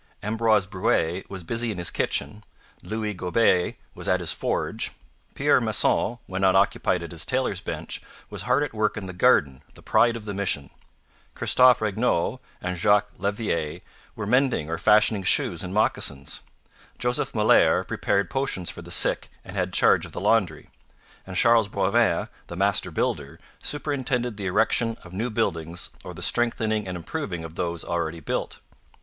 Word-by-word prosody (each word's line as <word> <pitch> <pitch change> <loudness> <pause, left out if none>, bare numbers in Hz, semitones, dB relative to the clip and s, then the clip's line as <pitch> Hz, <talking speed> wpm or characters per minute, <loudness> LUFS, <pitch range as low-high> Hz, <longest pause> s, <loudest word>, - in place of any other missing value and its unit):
Ambroise 110 -1 +2
Brouet 90 -2 0
was 95 -3 -6
busy 115 +6 -1
in 105 - -4
his 85 -1 -1
kitchen; 105 0 -2 0.4
Louis 110 -1 -3
Gauber 90 0 +2 0.2
was - - -6
at - - +3
his - - 0
forge; - - -2 0.4
Pierre - - +3
Masson, 120 +4 +2
when 95 0 -4
not 95 -1 +4
occupied 95 -2 +2
at 85 - -8
his 80 -3 -1
tailor's 130 -7 -1
bench, - - -5 0.3
was - - -6
hard 145 - +2
at 145 - -4
work 110 -1 0
in 105 - -5
the 95 - -6
garden, 70 -6 +3
the - - -16
pride 115 0 +3
of 115 -2 -7
the 105 - -4
mission; 95 -9 -2 0.6
Christophe 125 -2 +4
Regnaut 110 -4 0 0.2
and 90 0 -2
Jacques 105 +2 +3
Levrier 100 -7 -2 0.3
were 105 - -4
mending 125 - +1
or 85 - -2
fashioning 105 -1 +4
shoes 95 - +1
and 90 - -5
moccasins; 95 -9 0 0.6
Joseph 125 0 -1
Molere - - +4
prepared 100 - 0
potions 135 -10 -1
for - - -9
the - - -12
sick - - +2 0.2
and 95 - -9
had 90 -1 -1
charge - - +4
of - - -16
the - - -4
laundry; 95 -9 +1 0.6
and 95 -1 -5
Charles 115 -2 +4
Boivin, 100 +4 +1 0.2
the - - -7
master - - +1
builder, - - -2 0.2
superintended 130 -5 -2
the 100 -2 -3
erection 115 +5 +1
of 90 - -13
new 110 +6 -2
buildings 85 -7 -2
or - - -8
the - - -5
strengthening 110 -3 +1
and 90 -1 -4
improving 90 - -4
of 80 -1 -8
those 85 -1 -2
already 85 -1 -2
built. 75 - -3
100 Hz, 165 wpm, -25 LUFS, 90-115 Hz, 0.6 s, not